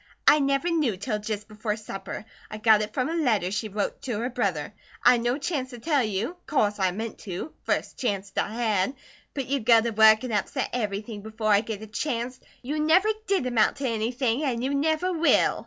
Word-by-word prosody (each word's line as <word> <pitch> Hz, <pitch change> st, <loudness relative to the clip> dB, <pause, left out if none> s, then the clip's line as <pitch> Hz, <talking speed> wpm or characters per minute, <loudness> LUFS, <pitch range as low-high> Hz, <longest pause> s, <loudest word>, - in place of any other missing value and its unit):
"I 300 Hz, -, +8 dB
never 275 Hz, +3 st, +1 dB
knew 290 Hz, -, +1 dB
till 210 Hz, +2 st, -2 dB
jist 210 Hz, 0 st, -4 dB
before 215 Hz, 0 st, -3 dB
supper. 195 Hz, -1 st, -7 dB, 0.2 s
I 215 Hz, -, -6 dB
got 215 Hz, -1 st, +5 dB
it 210 Hz, 0 st, -3 dB
frum 255 Hz, +2 st, -1 dB
a 325 Hz, -, -2 dB
letter 225 Hz, -, +1 dB
she 215 Hz, +2 st, -2 dB
wrote 205 Hz, +1 st, -3 dB
to 240 Hz, -5 st, -3 dB
her 240 Hz, +4 st, -2 dB
brother. 200 Hz, -, -1 dB, 0.3 s
I'd 245 Hz, -1 st, +6 dB
no 240 Hz, +3 st, 0 dB
chanct 280 Hz, -3 st, -2 dB
to 245 Hz, -, -9 dB
tell 290 Hz, +3 st, +1 dB
you. 220 Hz, -, -2 dB
Course 210 Hz, -9 st, +1 dB
I 190 Hz, -1 st, +3 dB
meant 220 Hz, +5 st, -5 dB
to, 190 Hz, -, -6 dB
first -, -, -1 dB
chanct 200 Hz, -5 st, -2 dB
I -, -, 0 dB
had; 220 Hz, 0 st, 0 dB, 0.4 s
but 275 Hz, -2 st, -2 dB
you 275 Hz, +2 st, 0 dB
go 230 Hz, 0 st, +6 dB
to 230 Hz, +1 st, -1 dB
work 220 Hz, +1 st, +6 dB
an 250 Hz, -, -4 dB
upset 205 Hz, -2 st, -1 dB
everything 210 Hz, -2 st, -3 dB
before 220 Hz, 0 st, -2 dB
I 200 Hz, -, +5 dB
get 220 Hz, -1 st, -6 dB
a -, -, -8 dB
chanct. 245 Hz, +2 st, -3 dB, 0.2 s
You 295 Hz, +5 st, -2 dB
never 330 Hz, +7 st, +4 dB, 0.2 s
did 385 Hz, -9 st, +1 dB
amount 240 Hz, -4 st, +2 dB
to 275 Hz, -2 st, -2 dB
anything, 235 Hz, +3 st, 0 dB
an' 245 Hz, -4 st, -1 dB
you 270 Hz, +2 st, 0 dB
never 315 Hz, +5 st, +1 dB
will." 335 Hz, 0 st, +3 dB
230 Hz, 210 wpm, -26 LUFS, 210-275 Hz, 0.4 s, I